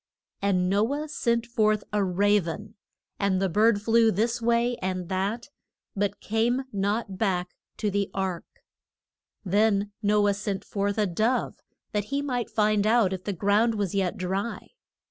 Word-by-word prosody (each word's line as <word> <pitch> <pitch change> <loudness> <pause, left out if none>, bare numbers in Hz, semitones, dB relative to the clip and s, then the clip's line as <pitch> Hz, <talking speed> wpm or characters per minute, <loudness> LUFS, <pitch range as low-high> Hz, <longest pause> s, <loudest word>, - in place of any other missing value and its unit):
And 185 -2 +2
No 205 +7 +2
ah 305 - -3
sent 235 -6 0
forth 215 -3 +1
a 205 -1 +2
ra 200 +3 +3
ven, 200 +5 -6 0.5
and 200 -2 +1
the 195 - +1
bird 210 +3 +3
flew 225 0 +4
this 230 +4 0
way 235 +1 +2
and 185 -2 -3
that, 200 +7 -2 0.5
but 205 0 -1
came 235 +4 0
not 200 0 -1
back 180 -4 0 0.3
to 210 -2 -1
the 200 0 0
ark. 190 -3 -4 0.8
Then 205 +1 +2
No 205 -1 +3
ah - - +4
sent 200 -1 -3
forth 200 0 -2
a 210 - +3
dove, 220 +7 0 0.3
that 205 -1 -1
he 280 +4 -2
might 250 -4 -2
find 210 -1 +2
out 220 -4 +3
if 185 -1 -6
the 205 - -1
ground 205 +5 +2
was 200 -4 -2
yet 190 -3 0
dry. 190 +5 -3
205 Hz, 165 wpm, -26 LUFS, 195-225 Hz, 0.8 s, flew